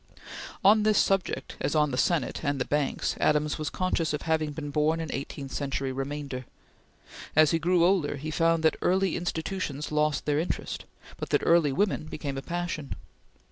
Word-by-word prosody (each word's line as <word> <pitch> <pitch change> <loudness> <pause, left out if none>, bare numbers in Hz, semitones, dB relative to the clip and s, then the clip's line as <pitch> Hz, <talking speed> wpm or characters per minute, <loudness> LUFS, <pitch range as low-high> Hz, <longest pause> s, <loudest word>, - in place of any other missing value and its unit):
On 210 +2 +6
this 215 -1 +3
subject, 195 -2 0
as - - 0
on 150 -1 +3
the - - -1
Senate 150 +2 0
and 145 -2 0
the 125 - 0
banks, 145 -1 0
Adams 150 0 +2
was 155 - -2
conscious 170 -4 -1
of 150 - -3
having 160 -2 0
been 145 0 -6
born 155 +3 +2
an 160 -3 -4
eighteenth 135 0 -5
century 135 -1 -2
remainder. 135 -1 -4 0.9
As 155 -1 +6
he 165 - +2
grew 170 +1 +3
older, 175 -6 +2
he 155 +3 -5
found 165 +1 +2
that 160 - +3
Early 190 0 +2
Institutions 165 -4 -3
lost 150 -1 +1
their 150 0 +1
interest, 165 - -3 0.3
but - - -5
that - - +2
Early 165 -4 +4
Women 185 +2 0
became 145 -3 -5
a 135 - -3
passion. 175 -3 -4
155 Hz, 180 wpm, -28 LUFS, 145-170 Hz, 0.9 s, On